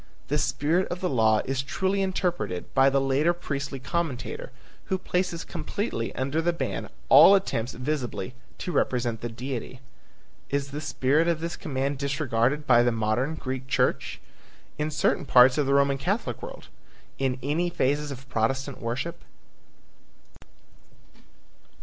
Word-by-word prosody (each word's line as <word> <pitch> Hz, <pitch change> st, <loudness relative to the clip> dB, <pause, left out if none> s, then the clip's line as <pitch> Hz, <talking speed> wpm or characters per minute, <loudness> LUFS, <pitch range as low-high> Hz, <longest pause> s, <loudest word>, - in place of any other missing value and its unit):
The 150 Hz, +1 st, +1 dB
spirit 165 Hz, +7 st, +1 dB
of 175 Hz, -, -4 dB
the 180 Hz, -, -1 dB
law 110 Hz, -4 st, +3 dB
is 135 Hz, 0 st, -1 dB
truly 190 Hz, +8 st, -1 dB
interpreted 180 Hz, -, -2 dB
by 135 Hz, 0 st, +5 dB
the 135 Hz, 0 st, +2 dB
later 135 Hz, +5 st, +2 dB
priestly 140 Hz, -5 st, -4 dB
commentator 170 Hz, -, -3 dB, 0.3 s
who 190 Hz, -, 0 dB
places 180 Hz, -2 st, -1 dB
completely 170 Hz, -, -3 dB
under 140 Hz, +5 st, 0 dB
the 175 Hz, +1 st, +1 dB
ban 95 Hz, -, -3 dB, 0.2 s
all 195 Hz, -, +9 dB
attempts 130 Hz, -, -1 dB
visibly 130 Hz, -5 st, -3 dB, 0.2 s
to 180 Hz, -, -4 dB
represent 120 Hz, -7 st, 0 dB
the 120 Hz, -, -3 dB
Deity. 125 Hz, +1 st, -5 dB, 0.7 s
Is 140 Hz, 0 st, -1 dB
the 150 Hz, +2 st, -4 dB
spirit 150 Hz, +2 st, +1 dB
of 170 Hz, -2 st, +1 dB
this 170 Hz, +1 st, -3 dB
command 140 Hz, -1 st, -2 dB
disregarded 140 Hz, -1 st, 0 dB
by 120 Hz, -3 st, +6 dB
the 120 Hz, 0 st, +3 dB
modern 115 Hz, +7 st, 0 dB
Greek 130 Hz, -3 st, -5 dB
church? -, -, 0 dB, 0.6 s
In 150 Hz, +1 st, 0 dB
certain 150 Hz, -, +1 dB
parts 125 Hz, +2 st, +6 dB
of 145 Hz, -, +1 dB
the 140 Hz, -, +2 dB
Roman 140 Hz, -1 st, +3 dB
Catholic 195 Hz, -, -2 dB
world? -, -, -9 dB, 0.5 s
In 135 Hz, -1 st, 0 dB
any 160 Hz, +6 st, 0 dB
phases 145 Hz, -1 st, 0 dB
of 135 Hz, -1 st, -8 dB
Protestant 130 Hz, +3 st, -1 dB
worship? 125 Hz, +8 st, -4 dB
140 Hz, 145 wpm, -26 LUFS, 125-165 Hz, 0.7 s, all